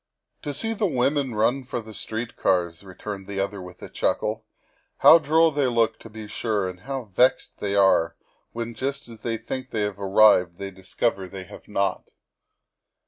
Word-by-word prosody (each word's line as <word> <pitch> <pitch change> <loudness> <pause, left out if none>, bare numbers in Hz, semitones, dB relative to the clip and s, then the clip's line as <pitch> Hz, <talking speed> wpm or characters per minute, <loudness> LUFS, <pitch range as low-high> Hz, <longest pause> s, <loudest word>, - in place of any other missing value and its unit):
" - - -52
To 145 - -3
see 225 +11 -1
the 210 -1 0
women 135 -3 0
run 120 +5 +2
for 125 - -4
the 110 -1 -10
street 115 +2 -4
cars," 85 -1 0
returned 95 +1 -7
the 100 -1 -4
other 100 0 -2
with 90 0 -11
a - - -6
chuckle; - - -1 0.2
' - - -38
' - - -45
how 165 - +9
droll 160 +2 +4
they 145 -2 +1
look, 115 -2 +1
to 115 - -12
be 110 0 -8
sure, 105 -2 -1
and 90 -1 -7
how 135 +5 -4
vexed 125 +6 +2
they 100 -1 -1
are 85 -4 +4 0.4
when 115 0 -4
just 135 +4 -3
as 115 -2 -12
they 115 -1 -2
think 130 +3 -5
they 110 - -2
have 105 -1 -3
arrived 95 -3 +5
they 100 0 -6
discover 95 +1 -2
they 95 0 -7
have 90 - -13
not." 100 -1 -1
110 Hz, 195 wpm, -25 LUFS, 95-130 Hz, 0.4 s, how